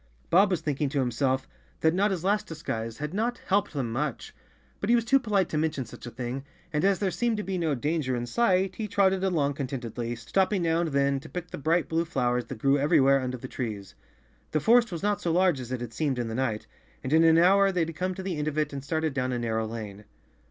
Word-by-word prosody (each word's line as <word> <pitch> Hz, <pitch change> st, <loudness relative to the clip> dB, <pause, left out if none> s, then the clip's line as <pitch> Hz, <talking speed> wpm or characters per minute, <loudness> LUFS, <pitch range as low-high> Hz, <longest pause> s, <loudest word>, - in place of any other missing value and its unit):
Bob 195 Hz, +3 st, +6 dB
was 180 Hz, -4 st, 0 dB
thinking 145 Hz, -1 st, -1 dB
to 145 Hz, -, -3 dB
himself 130 Hz, +1 st, 0 dB, 0.3 s
that 160 Hz, 0 st, +3 dB
Notta's 190 Hz, -2 st, +1 dB
last 205 Hz, +2 st, +1 dB
dis¬ 160 Hz, -1 st, -9 dB
guise 115 Hz, 0 st, -3 dB
had 150 Hz, +2 st, -5 dB
not 235 Hz, +4 st, -1 dB
helped 200 Hz, 0 st, +1 dB
them 130 Hz, -6 st, -2 dB
much, 135 Hz, +2 st, -3 dB, 0.5 s
but 200 Hz, -, -3 dB
he 240 Hz, -, +6 dB
was 235 Hz, -1 st, +1 dB
too 270 Hz, +4 st, +4 dB
polite 205 Hz, -7 st, +1 dB
to 150 Hz, -, -1 dB
mention 155 Hz, -4 st, -1 dB
such 115 Hz, -, -11 dB
a -, -, -4 dB
thing, 125 Hz, +3 st, -5 dB, 0.3 s
and 150 Hz, -, 0 dB
as 195 Hz, 0 st, +3 dB
there 195 Hz, -1 st, 0 dB
seemed 235 Hz, +1 st, 0 dB
to 210 Hz, -, -2 dB
be 190 Hz, -1 st, -3 dB
no 165 Hz, -5 st, 0 dB
danger 145 Hz, -1 st, -1 dB
in 120 Hz, 0 st, -2 dB
sight 190 Hz, -, +1 dB
he 220 Hz, -, -3 dB
trotted 190 Hz, -1 st, +2 dB
along 155 Hz, -7 st, +1 dB
contentedly, 120 Hz, -4 st, -4 dB
stopping 185 Hz, -, 0 dB
now 165 Hz, 0 st, +2 dB
and 170 Hz, -, -1 dB
then 140 Hz, -1 st, +1 dB
to 155 Hz, +3 st, -12 dB
pick 180 Hz, -1 st, -6 dB
the -, -, -5 dB
bright 165 Hz, +4 st, +1 dB
blue 165 Hz, +1 st, +1 dB
flowers 125 Hz, -6 st, 0 dB
that 135 Hz, -, -7 dB
grew 135 Hz, +5 st, +2 dB
everywhere 140 Hz, -2 st, +4 dB
under 130 Hz, 0 st, -3 dB
the 130 Hz, -, -8 dB
trees. 105 Hz, -7 st, -5 dB, 0.6 s
The 155 Hz, -, 0 dB
forest 235 Hz, -, +4 dB
was 170 Hz, +1 st, -5 dB
not 205 Hz, 0 st, +1 dB
so 170 Hz, -, 0 dB
large 180 Hz, -4 st, +3 dB
as 125 Hz, -1 st, -7 dB
it 130 Hz, -2 st, -3 dB
had 120 Hz, -2 st, -6 dB
seemed 140 Hz, -1 st, -1 dB
in 120 Hz, -2 st, -2 dB
the -, -, -4 dB
night, 115 Hz, -3 st, -1 dB, 0.4 s
and 130 Hz, -, -2 dB
in 160 Hz, +1 st, +6 dB
an 165 Hz, 0 st, +6 dB
hour 195 Hz, +3 st, +5 dB
they 180 Hz, -2 st, 0 dB
had 165 Hz, 0 st, -2 dB
come 185 Hz, +2 st, -2 dB
to 190 Hz, -, -6 dB
the 185 Hz, -4 st, -3 dB
end 150 Hz, -, -2 dB
of 155 Hz, 0 st, -2 dB
it 150 Hz, -1 st, 0 dB
and 140 Hz, -1 st, -5 dB
started 160 Hz, +1 st, -1 dB
down 130 Hz, -1 st, -1 dB
a 125 Hz, -, -1 dB
narrow 110 Hz, -2 st, -1 dB
lane. 105 Hz, -2 st, -7 dB
155 Hz, 250 wpm, -27 LUFS, 130-185 Hz, 0.6 s, Bob